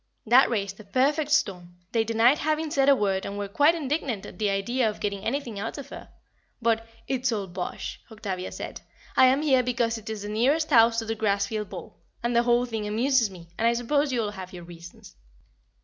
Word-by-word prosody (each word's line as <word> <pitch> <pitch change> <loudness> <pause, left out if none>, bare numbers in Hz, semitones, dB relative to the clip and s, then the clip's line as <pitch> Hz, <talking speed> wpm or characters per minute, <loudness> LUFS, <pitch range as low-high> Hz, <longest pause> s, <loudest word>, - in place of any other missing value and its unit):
That 245 +4 +6
raised 200 -4 -2
a - - -10
perfect 280 +8 +1
storm, 180 - 0 0.2
they 225 -1 +2
denied 230 +5 +3
having 310 0 -1
said 275 -1 +3
a 280 - +7
word 195 -5 0
and 200 - -5
were 205 0 -3
quite 290 +11 +4
indignant 280 - -2
at 180 - -11
the 210 -2 +1
idea 220 +5 +1
of 210 - -7
getting 200 -1 -3
anything 235 -4 -3
out 225 +7 -4
of 280 -1 -8
her; - - -10 0.5
but 225 -1 +1 0.2
"It's 255 -1 0
all 205 -3 -2
bosh," 180 0 -6
Octavia 190 -4 -5
said, - - -7 0.3
"I 260 - +7
am 270 +4 +3
here 265 -4 +4
because 235 -2 -1
it 215 - -10
is 215 -2 -5
the 205 - -5
nearest 275 +9 +1
house 230 -2 +6
to 225 - -1
the 225 0 -2
Grassfield 210 0 -1
ball, - - -9 0.2
and 235 0 0
the 235 - +5
whole 240 0 +2
thing 220 -3 -4
amuses 235 +2 +2
me, 175 -3 -13
and 230 - +3
I 235 - +4
suppose 280 +5 0
you 240 -3 0
all 205 - -3
have 190 -2 -9
your 175 -1 -8
reasons." 170 0 -13
225 Hz, 215 wpm, -26 LUFS, 200-260 Hz, 0.5 s, a